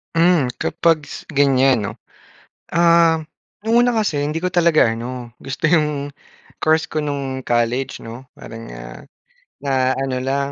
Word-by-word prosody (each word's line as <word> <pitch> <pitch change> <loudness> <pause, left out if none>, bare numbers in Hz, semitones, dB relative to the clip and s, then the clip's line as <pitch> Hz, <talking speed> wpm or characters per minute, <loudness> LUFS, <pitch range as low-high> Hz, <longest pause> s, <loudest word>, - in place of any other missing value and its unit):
Hmm, 165 -7 +3
kapag 160 -3 0
ganyan, 135 -2 +4
'no? - - -4 0.8
Um, 170 -2 +4 0.4
una 240 +1 +4
kasi 205 -11 0
hindi 155 +2 -2
ko 180 - 0
talaga 170 -7 +4
ano, 120 +1 -6
gusto 135 +4 -2
'yong 150 -3 +1 0.5
course 160 0 +1
ko 155 -1 -2
no'ng 135 -2 -4
college, 120 +3 0
'no? 115 +3 -9
Parang, 115 0 -10
ah, - - -10 0.6
na 130 -2 +1
ano 135 -1 -2
lang, 140 +1 -1
145 Hz, 130 wpm, -20 LUFS, 130-165 Hz, 0.8 s, ganyan